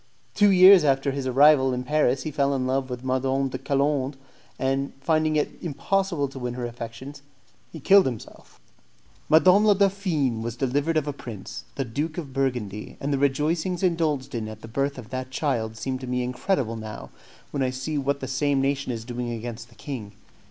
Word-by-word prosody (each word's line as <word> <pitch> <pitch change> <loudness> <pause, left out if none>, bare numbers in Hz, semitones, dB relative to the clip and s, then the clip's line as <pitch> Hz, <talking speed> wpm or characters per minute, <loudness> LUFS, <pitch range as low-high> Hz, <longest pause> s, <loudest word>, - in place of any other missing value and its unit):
Two 205 -1 +5
years 185 -1 +8
after 135 -1 +2
his 135 -1 -3
arrival 135 0 +5
in 125 - -3
Paris 135 -2 +1
he 155 - -4
fell 140 -1 +1
in 130 -1 -1
love 130 +1 -1
with 125 0 -6
Madame 130 +1 0
de 130 - -5
Colande, 140 0 0 0.4
and, 135 +1 -1
finding 155 +2 +1
it 150 - +1
impossible 170 0 -1
to 135 0 -9
win 125 -1 -4
her 125 -1 -3
affections, 120 +4 -8 0.5
he 160 - -8
killed 195 +5 +6
himself. 120 -5 -8 0.7
Madame 180 +6 +6
la 210 -1 +5
Dauphine 185 - +1
was 115 0 -4
delivered 145 +5 0
of 155 - +1
a 145 - -2
prince, 115 -8 -8
the 135 - -2
Duke 150 +7 -3
of 145 -6 -6
Burgundy, 125 -7 -3
and 140 +1 -2
the 135 - 0
rejoicings 160 +6 0
indulged 155 -6 0
in 115 -2 -3
at 110 0 -9
the - - -9
birth 140 +4 -2
of 120 -1 -10
that 130 0 -4
child 120 -5 -2
seem 130 +2 -3
to 130 - -7
me 125 0 -1
incredible 125 - -1
now, 110 -1 -8 0.4
when 140 - -2
I 130 - +2
see 130 +4 -3
what 140 +1 -1
the 130 - -4
same 135 +2 +1
nation 135 0 0
is 115 -1 -5
doing 120 0 -4
against 115 0 -6
the 120 - -20
king. 115 -8 -7
135 Hz, 195 wpm, -25 LUFS, 125-150 Hz, 0.7 s, years